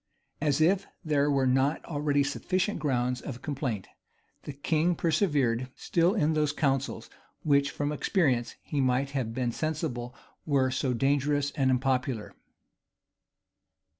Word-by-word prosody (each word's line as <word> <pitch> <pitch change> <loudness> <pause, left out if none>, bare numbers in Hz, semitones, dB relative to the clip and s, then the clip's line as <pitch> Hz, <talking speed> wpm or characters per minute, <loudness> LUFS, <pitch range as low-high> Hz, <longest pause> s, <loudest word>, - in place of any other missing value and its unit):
As 150 0 +1
if 185 +4 +3 0.2
there 145 -2 +2
were 135 -2 +2
not 135 +4 +1
already 145 -2 +1
sufficient 185 +7 -1
grounds 125 -3 0
of 125 -4 -7
complaint, 130 - -3 0.6
the - - -4
king 160 +5 +1
persevered 140 - +1
still 175 +4 +1
in 160 -6 +2
those 150 -2 +1
counsels 135 -2 -1 0.4
which, 140 -1 +3
from 145 +1 -2
experience, 145 - +1
he 145 - -1
might 130 +2 +1
have 130 -5 -2
been 125 -2 0
sensible 140 -5 -3 0.3
were 135 -4 +2
so 130 -1 0
dangerous 145 +2 +1
and 135 -4 +1
unpopular. 130 -3 0
140 Hz, 130 wpm, -28 LUFS, 130-155 Hz, 0.6 s, if